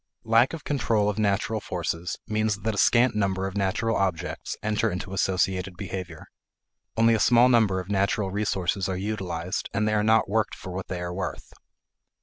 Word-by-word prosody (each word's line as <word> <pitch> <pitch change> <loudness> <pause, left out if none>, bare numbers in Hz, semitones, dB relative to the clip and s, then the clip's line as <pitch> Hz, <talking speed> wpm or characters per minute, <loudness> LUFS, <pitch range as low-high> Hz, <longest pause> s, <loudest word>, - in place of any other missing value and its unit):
Lack 115 +5 +4
of 165 - -6
control 110 -7 +1
of 105 - -6
natural 105 +1 0
forces 85 -2 -3
means 110 -1 0
that 110 +2 -1
a - - -5
scant 120 +2 +4
number 95 -2 0
of 95 0 -5
natural 100 +3 0
objects 95 -4 -2
enter 110 +1 +1
into 95 0 -5
associated 95 -1 0
behavior. 90 -4 -6 0.7
Only 115 0 +5
a 110 - +2
small 120 +3 +5
number 110 -6 +3
of 90 - -6
natural 100 0 0
resources 95 -2 -1
are 95 - -2
utilized 95 -3 -3
and 105 +1 +1
they 110 - +1
are 105 - +2
not 110 +1 +3
worked 105 +1 0
for 95 - -9
what 95 +1 -5
they 90 -2 -4
are 90 0 -4
worth. 95 0 -5
100 Hz, 180 wpm, -26 LUFS, 95-110 Hz, 0.7 s, Only